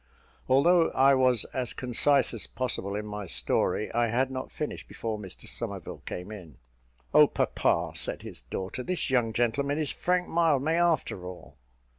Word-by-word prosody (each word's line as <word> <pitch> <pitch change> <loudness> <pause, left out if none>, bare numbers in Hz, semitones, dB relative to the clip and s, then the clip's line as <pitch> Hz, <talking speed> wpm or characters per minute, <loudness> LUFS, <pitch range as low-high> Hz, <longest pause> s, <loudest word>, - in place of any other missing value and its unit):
Although 165 +6 +4
I 135 +1 +5
was 130 -4 +4
as 125 -3 -2
concise 130 +2 +2
as 115 - -3
possible 110 -5 -2
in 105 0 -4
my 105 -2 -6
story, 65 - 0
I 120 0 +2
had 125 +4 0
not 130 0 -5
finished 150 - -5
before 110 -2 -5
Mr 95 -3 -9
Somerville - - -3
came 90 +4 -6
in. 85 - -11 0.6
"Oh, - - +8
papa," - - 0
said - - -1
his - - -8
daughter, 95 - -5
"this 175 0 -2
young 120 -3 +2
gentleman 140 +5 0
is 155 -3 0
Frank 180 0 0
Mildmay, 160 -2 +2
after 165 - 0
all." 90 -5 -11
125 Hz, 160 wpm, -28 LUFS, 105-140 Hz, 0.6 s, Oh